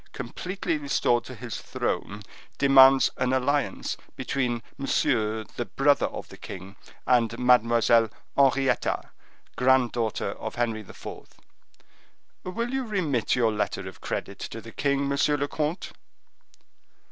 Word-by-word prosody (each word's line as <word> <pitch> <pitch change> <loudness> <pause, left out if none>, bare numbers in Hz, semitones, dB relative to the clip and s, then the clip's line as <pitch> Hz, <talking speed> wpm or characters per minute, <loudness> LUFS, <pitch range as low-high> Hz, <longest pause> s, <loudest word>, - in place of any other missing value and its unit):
completely 180 -4 -3
restored 130 -4 +1
to - - -9
his - - -6
throne, 105 +1 -3 0.3
demands 135 -1 +7
an 125 - +1
alliance 140 +2 0 0.2
between 120 -4 -2
Monsieur, 110 -5 0
the 120 - -1
brother 140 +3 +2
of - - -7
the - - -12
king, 95 +1 -9 0.3
and 115 -2 +2
Mademoiselle 115 -2 +4 0.3
Henrietta, 135 -1 +2 0.4
grand 125 0 +3
daughter 115 -3 -2
of - - -6
Henry 115 -2 -1
IV. 100 - -14 1.4
Will 230 +7 -3
you 265 0 0
remit 175 - 0
your 115 -3 +2
letter 105 -1 -2
of - - -11
credit - - -4
to - - -6
the - - -11
king, 140 -1 0
monsieur 140 +1 +2
le 145 0 -1
comte?" 155 +4 -3
130 Hz, 125 wpm, -26 LUFS, 115-140 Hz, 1.4 s, demands